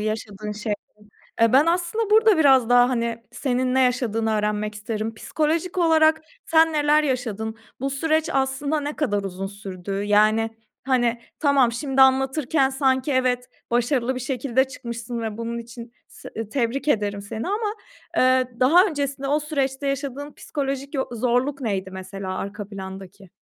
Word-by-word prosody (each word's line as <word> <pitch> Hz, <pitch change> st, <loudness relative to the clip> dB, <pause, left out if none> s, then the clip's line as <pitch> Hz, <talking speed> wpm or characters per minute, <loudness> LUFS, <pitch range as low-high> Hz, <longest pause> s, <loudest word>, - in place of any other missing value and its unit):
yaşadığın 215 Hz, -1 st, -4 dB
şeylerin. 210 Hz, 0 st, -2 dB, 0.7 s
Ben 255 Hz, +6 st, +5 dB
aslında 360 Hz, +6 st, 0 dB
burada 435 Hz, -3 st, +5 dB
biraz 265 Hz, -6 st, +5 dB
daha, 245 Hz, 0 st, +6 dB
hani, 235 Hz, -2 st, -2 dB
senin 255 Hz, -1 st, -1 dB
ne 265 Hz, -, +4 dB
yaşadığını 230 Hz, -3 st, +1 dB
öğrenmek 210 Hz, 0 st, -1 dB
isterim. 220 Hz, +1 st, -4 dB
Psikolojik 320 Hz, +9 st, -1 dB
olarak 320 Hz, -2 st, +4 dB, 0.3 s
sen 320 Hz, 0 st, +4 dB
neler 300 Hz, 0 st, +3 dB
yaşadın? 225 Hz, -5 st, -2 dB, 0.2 s
Bu 275 Hz, +1 st, -1 dB
süreç 315 Hz, +3 st, 0 dB
aslında 270 Hz, +3 st, 0 dB
ne 290 Hz, +1 st, -4 dB
kadar 205 Hz, -9 st, 0 dB
uzun 195 Hz, 0 st, -5 dB
sürdü? 195 Hz, -1 st, -7 dB
Yani, 215 Hz, +2 st, +3 dB, 0.3 s
hani, 240 Hz, -3 st, +1 dB, 0.2 s
tamam, 275 Hz, -5 st, +4 dB
şimdi 270 Hz, +2 st, +2 dB
anlatırken 265 Hz, +1 st, +3 dB
sanki 265 Hz, 0 st, +1 dB
evet, 250 Hz, -1 st, +1 dB, 0.2 s
başarılı 245 Hz, +1 st, +1 dB
bir 255 Hz, -, -4 dB
şekilde 260 Hz, 0 st, 0 dB
çıkmışsın 235 Hz, -2 st, -6 dB
ve 220 Hz, -1 st, -4 dB
bunun 230 Hz, 0 st, -3 dB
için 235 Hz, 0 st, -10 dB, 0.2 s
s -, -, -12 dB, 0.2 s
tebrik 265 Hz, +3 st, -1 dB
ederim 205 Hz, -6 st, 0 dB
seni 220 Hz, -, -5 dB
ama, 420 Hz, +1 st, -1 dB, 0.4 s
eee, 255 Hz, 0 st, +4 dB
daha 330 Hz, +9 st, +6 dB
öncesinde 280 Hz, -4 st, -3 dB
o 295 Hz, +2 st, +2 dB
süreçte 280 Hz, -2 st, -2 dB
yaşadığın 280 Hz, +1 st, -4 dB
psikolojik 275 Hz, 0 st, -4 dB
yo 265 Hz, -, 0 dB
zorluk 250 Hz, +4 st, 0 dB
neydi 195 Hz, -5 st, -2 dB
mesela 190 Hz, 0 st, -6 dB
arka 200 Hz, 0 st, -6 dB
plandaki? 190 Hz, -1 st, -9 dB
255 Hz, 145 wpm, -23 LUFS, 220-280 Hz, 0.7 s, daha